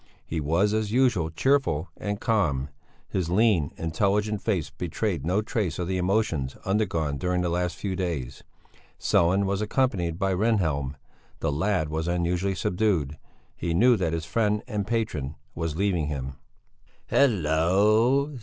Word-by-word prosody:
He 80 - -3
was, 85 +8 +1
as 110 -1 0
usual, 120 -10 +2
cheerful 85 - +1
and 105 -1 -4
calm; 75 - 0 0.4
his 90 -4 -2
lean, 95 -6 +3
intelligent 100 +5 0
face 90 -10 -1
betrayed 85 +1 -2
no 95 +4 +1
trace 105 -7 -2
of 90 - -2
the 95 0 -1
emotions 90 -8 0
undergone 85 -8 0
during 90 +3 0
the 90 - 0
last 90 -1 -1
few 95 0 -3
days. 85 -9 -4 0.6
Sellén 95 +4 +3
was 100 +1 -1
accompanied 105 -8 0
by 95 0 0
Rehnhjelm; 85 -10 0 0.4
the - - 0
lad 80 +1 0
was 80 +2 -2
unusually 90 +2 0
subdued; 90 -7 0 0.4
he 85 -1 -2
knew 120 +7 +5
that 85 -6 -1
his 80 -1 -2
friend 105 +4 0
and 105 -5 -3
patron 80 - -2 0.2
was 80 -2 -3
leaving 90 -4 0
him. 70 -2 -4 0.8
"Hallo! 110 - +3
90 Hz, 145 wpm, -26 LUFS, 80-105 Hz, 0.8 s, knew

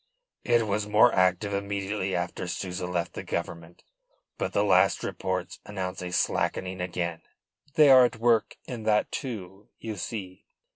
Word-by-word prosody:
"It 120 -1 +3
was 105 0 -1
more 110 +3 +5
active 95 +2 +2
immediately 100 -1 -2
after 90 0 -3
Souza 90 0 -4
left 90 -1 -2
the - - -5
Government. 85 +1 -5 0.6
But - - -1
the 100 - +2
last 95 -3 +3
reports - - -3
announce 95 -3 -5
a 90 - -4
slackening 95 +1 -1
again." 85 -2 -3 0.5
"They 150 -3 +7
are 130 -1 +9
at 120 - -1
work 115 -1 +2
in 120 -3 -6
that, 105 -1 +2
too, 100 -7 -6
you 110 -2 -6
see. 95 -1 -6
100 Hz, 150 wpm, -27 LUFS, 90-110 Hz, 0.6 s, are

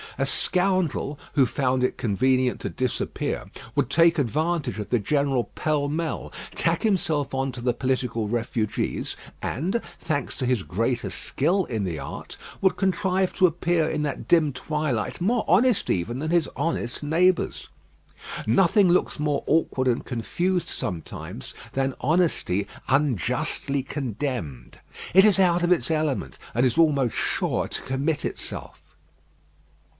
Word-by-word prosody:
A 135 - +1
scoundrel, 180 -3 +1 0.2
who 140 -3 +5
found 125 +1 0
it 125 - 0
convenient 130 +4 +1
to - - -2
disappear, 130 -2 -2 0.3
would - - +1
take 170 0 +4
advantage 150 +1 0
of 105 - -5
the 120 - +2
general 135 +2 +1
pell 150 -2 0
mell, 160 +2 -3 0.2
tack - - 0
himself 165 -10 +1
on 135 0 0
to 120 - -7
the 120 0 +1
political 125 -3 -1
refugees, 115 -1 -2 0.3
and, 180 - -1 0.2
thanks 145 -5 -2
to 130 - 0
his 125 -6 +1
greater 115 +7 -1
skill 180 +7 +1
in 110 -4 -2
the 85 -4 -2
art, - - -7 0.3
would 190 - +3
contrive 190 0 +1
to 185 - +5
appear 170 -1 +1
in 150 - -1
that 145 -3 -3
dim 155 -5 +4
twilight 140 -2 -2
more 225 +6 +1
honest 220 +6 +3
even 105 +7 0
than 155 +2 -2
his 170 -4 +2
honest 140 -4 -2
neighbours. 175 +4 +2 0.8
Nothing 190 - +4
looks 175 -3 +2
more 150 -1 0
awkward 135 -5 +2
and 120 -1 +1
confused 175 +9 -1
sometimes 80 -6 -6 0.2
than 135 0 0
honesty 140 - +1 0.2
unjustly 135 - +1
condemned. 120 - -4 0.3
It 190 +3 +8
is 205 -2 +5
out 175 -2 +4
of 175 - +2
its 165 -7 +2
element, 155 -4 -1 0.2
and 120 +2 +3
is 125 +1 +1
almost 140 -8 +3
sure - - 0
to - - -3
commit 140 +4 -1
itself. - - -6
145 Hz, 140 wpm, -25 LUFS, 125-170 Hz, 0.8 s, It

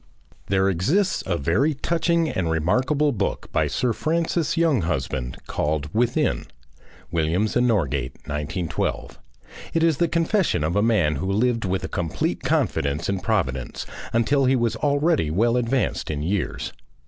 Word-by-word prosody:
There 95 0 +2
exists 150 - +1
a 90 -3 0
very 110 - +1
touching 170 +2 +1
and 90 - -1
remarkable 125 - +2
book 100 -6 -3
by - - +1
Sir 125 -2 0
Francis 165 +3 0
Younghusband 80 - 0
called 75 0 -2
"Within." 120 +5 +1 0.7
[Williams 85 +6 0
and 125 0 +3
Norgate, 70 - 0
1912.] 75 +3 -3 0.6
It 165 - +3
is 165 -4 +3
the 170 - +2
confession 170 - +1
of 80 +2 0
a 105 - +3
man 95 -10 +2
who 95 +7 -2
lived 115 +2 +1
with 95 0 -1
a - - -2
complete 85 -4 -2
confidence 70 +5 0
in 100 -1 0
Providence 80 - -1 0.3
until 135 +4 +2
he 130 +1 +4
was 115 -2 +1
already 145 - +2
well 115 +9 +2
advanced 125 +1 0
in 75 -1 -2
years. 80 -8 -2
105 Hz, 145 wpm, -23 LUFS, -, 0.7 s, he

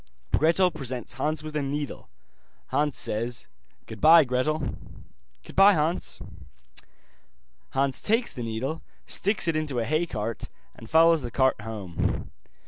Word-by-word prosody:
Gretel 175 +3 +3
presents 125 -5 -5
Hans 150 +4 -2
with 155 0 -7
a 150 - +1
needle, 145 +1 -4 0.6
Hans 150 -2 0
says: 115 +3 -1 0.4
'Goodbye, 155 +9 +6
Gretel.' 135 +3 -1 0.7
'Goodbye, 195 +1 +5
Hans.' 160 +1 -1 1.5
Hans 135 0 0
takes 230 +3 +1
the 125 - -6
needle, 120 +8 -3 0.2
sticks 205 -2 +1
it 165 - +1
into 155 -4 -2
a 115 - 0
hay 155 +6 0
cart, 110 -3 -4 0.3
and 115 - -13
follows 165 0 +5
the 120 - -5
cart 130 -2 +1
home. 105 -6 -3
145 Hz, 130 wpm, -26 LUFS, 120-160 Hz, 1.5 s, Goodbye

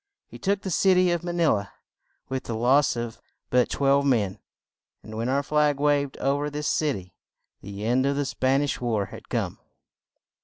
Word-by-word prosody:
He - - -13
took 200 0 0
the 190 - -3
cit 185 +3 +4
y 180 -1 +4
of 170 -1 -2
Ma 175 - -3
ni 170 -1 +1
la 100 -8 +2 0.6
with 130 -1 -4
the 115 - -3
loss 130 +5 +3
of 120 -1 -5 0.3
but 125 0 +3
twelve 140 0 +2
men, 110 -9 +1 0.6
and 110 - -9
when 115 +3 -2
our 140 +2 +1
flag 150 -1 +2
waved 145 -1 +1
o 140 +1 +1
ver 145 0 -2
this 150 0 -4
cit 150 -4 +1
y, 90 -1 -9 0.5
the 100 +2 -7
end 130 +4 +2
of 140 - +1
the 145 0 0
Span 135 +1 +1
ish 145 - -2
war 110 -5 0
had - - -11
come. - - -2
140 Hz, 200 wpm, -25 LUFS, 120-150 Hz, 0.6 s, cit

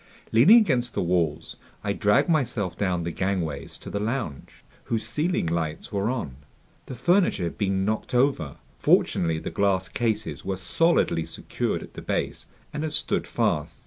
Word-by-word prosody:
Leaning 140 - +8
against 130 - +2
the - - +1
walls, 85 -4 -1 0.3
I - - 0
dragged 105 0 +3
myself 125 - 0
down 90 -4 0
the 85 - -2
gangways 90 -5 -2
to - - -9
the 100 - -2
lounge, 110 - -4 0.2
whose 110 -1 -2
ceiling 150 - 0
lights 80 -2 -2
were 100 +1 0
on. 95 - -3 0.5
The 130 - -6
furniture 170 - +2
had 85 - -3
been 95 -2 +1
knocked 110 +4 -2
over. 125 - +1 0.2
Fortunately 80 -2 +3
the - - -5
glass 95 -2 +1
cases 110 -3 -2
were 95 -1 -2
solidly 95 - +2
secured 80 - -3
at - - -13
the - - -8
base - - -3 0.3
and 150 - -3
had 155 -1 -2
stood - - 0
fast. 75 - -1
100 Hz, 165 wpm, -25 LUFS, 85-125 Hz, 0.5 s, Leaning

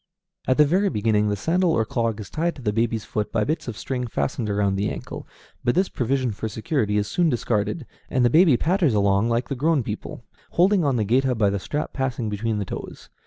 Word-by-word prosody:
At 130 - +2
the 150 - +7
very 190 +7 +2
beginning 105 - +1
the 105 - 0
sandal 170 - +1
or 110 -5 +1
clog 115 -1 -1
is 105 - -8
tied 170 +2 -1
to 135 - -11
the 105 -2 0
baby's 115 -1 0
foot 105 -1 -3
by 110 -2 +1
bits 155 +3 -2
of 115 -3 -5
string 125 -2 -3
fastened 105 - -2
around 100 -1 +1
the 100 +2 0
ankle, - - -7 0.4
but 120 - +1
this 185 +2 +2
provision 130 0 -1
for 110 +2 -4
security 110 -1 -1
is 105 0 0
soon 170 +9 +1
discarded, 120 +3 -1 0.2
and 125 -2 +2
the 120 - +3
baby 160 -5 +6
patters 170 - +2
along 100 +2 +2
like 115 +1 0
the - - -3
grown 150 +1 +1
people, 105 0 -6 0.3
holding 185 +1 +4
on 140 -3 +1
the 110 -3 0
géta 125 +3 +2
by 105 -2 +3
the 100 - -1
strap 150 +10 -4
passing 125 -5 -2
between 105 +1 -2
the 100 - -2
toes. - - -8
120 Hz, 225 wpm, -23 LUFS, 105-145 Hz, 0.4 s, the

